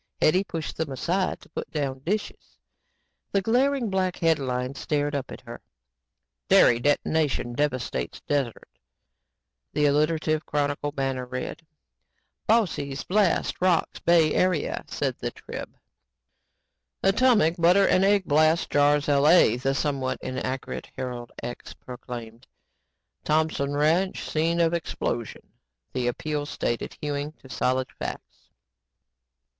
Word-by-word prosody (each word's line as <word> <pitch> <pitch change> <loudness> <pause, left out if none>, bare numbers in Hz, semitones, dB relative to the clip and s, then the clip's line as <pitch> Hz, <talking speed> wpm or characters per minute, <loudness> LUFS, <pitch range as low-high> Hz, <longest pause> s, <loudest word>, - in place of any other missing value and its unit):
Hetty 185 +5 +4
pushed 165 -5 -5
them 160 -3 -2
aside 175 +9 -1
to - - -17
put - - -6
down 140 -4 -2
dishes. 200 +10 -4 0.8
The 200 - +3
glaring 250 0 +2
black 185 -1 0
headlines 135 -5 0
stared 145 -1 -1
up 140 -2 -3
at - - -9
her. - - -10 0.9
"Dairy 120 - +6
Detonation 145 -1 +1
Devastates 135 -2 -2
Desert," 140 -5 -2 1.1
the 150 - +2
alliterative 155 +2 +2
Chronicle 145 0 -1
banner 135 -3 -2
read; 125 +5 -5 0.8
"Bossy's 155 -11 +1
Blast 195 -3 +1
Rocks 180 -3 +1
Bay 165 -2 +4
Area," 180 -5 +1
said - - -2
the - - -2
Trib; - - -9 1.3
"Atomic 195 -5 +4
Butter 180 +4 +5
And 185 - +3
Egg 200 -1 +3
Blast 155 +2 +3
Jars 145 0 +3
LA," 145 -3 +5
the 135 +2 -1
somewhat 135 -3 -1
inaccurate 130 0 -4
Herald 125 -2 -5
Ex 120 - -7
proclaimed; 120 -1 -9 0.8
"Thompson 150 -2 0
Ranch 165 +6 +1
Scene 165 +2 0
of 165 0 +2
Explosion," 120 -8 -3 0.5
the 125 -2 -1
Appeal 145 +4 -2
stated, 120 -5 -3
hewing 145 0 -3
to 130 - -18
solid 130 0 0
facts. - - -7
150 Hz, 120 wpm, -26 LUFS, 130-170 Hz, 1.3 s, Dairy